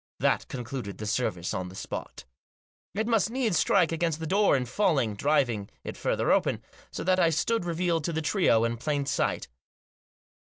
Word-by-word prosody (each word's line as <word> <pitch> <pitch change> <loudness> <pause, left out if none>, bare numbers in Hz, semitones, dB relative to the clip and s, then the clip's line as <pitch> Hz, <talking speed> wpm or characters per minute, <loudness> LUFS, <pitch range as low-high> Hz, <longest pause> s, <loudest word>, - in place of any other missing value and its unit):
That - - +1
concluded 120 -5 -6
the 105 - -6
service 100 -5 -1
on 90 0 -3
the 95 - -12
spot 60 - -6 0.7
It 220 +2 0
must 225 -3 +2
needs 230 -8 +1
strike 180 -5 +3
against 165 -1 -1
the 160 - -4
door 195 -1 +3
in 125 - -2
falling, 135 - +1
driving 120 -5 +1
it - - -6
further - - 0
open, - - +1 0.3
so - - -5
that 185 +1 +2
I 170 - +5
stood 180 +6 0
revealed 170 -1 0
to 170 - -1
the 160 0 -2
trio 150 - +3
in 115 0 0
plain 145 +3 -1
sight. 140 0 -1
155 Hz, 180 wpm, -28 LUFS, 120-180 Hz, 0.7 s, I